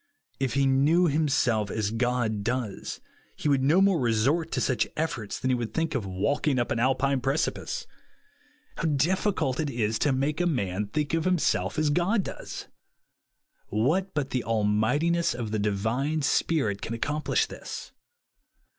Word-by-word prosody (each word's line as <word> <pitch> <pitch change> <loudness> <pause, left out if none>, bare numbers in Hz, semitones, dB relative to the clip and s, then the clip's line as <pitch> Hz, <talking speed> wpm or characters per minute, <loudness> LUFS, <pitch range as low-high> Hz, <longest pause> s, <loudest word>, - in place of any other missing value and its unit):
If 130 -4 -1
he 140 0 +3
knew 145 +7 +4
himself 135 -9 +1
as 105 0 -1
God 115 -3 0
does, 120 -3 -3 0.3
he - - -3
would 140 -2 +3
no 150 +7 +4
more 195 -3 +4
resort 130 +8 +1
to - - 0
such 125 -5 +1
efforts 130 -10 -2
than 130 - 0
he - - +3
would 120 -2 -1
OUR - - -19
ItESTING 165 0 0
PLACE. 130 - -1
3^ - - -8
think 95 - -6
of 90 - -7
walking 140 +4 +1
up 120 - 0
an 115 - 0
Alpine 135 +2 +2
precipice. 160 - -1 0.9
How - - -2
difficult 155 -1 +1
it 155 -2 0
is 115 -3 -1
to 145 - +2
make 140 +5 0
a 175 - +2
man 105 - -1
think 150 +7 -2
of 165 -1 +1
himself 150 - +1
as 155 -1 +2
God 185 +7 +2
does! - - -7 1.0
What 155 - 0
but 140 -3 -1
the 125 - -1
almightiness 115 +11 +1
of 115 -3 -4
the 110 - 0
Divine 115 +9 0
Spirit 135 -11 +1
can 115 - -4
ac 115 - -9
complish 150 +1 +1
this - - -8
135 Hz, 175 wpm, -27 LUFS, 110-155 Hz, 1.0 s, knew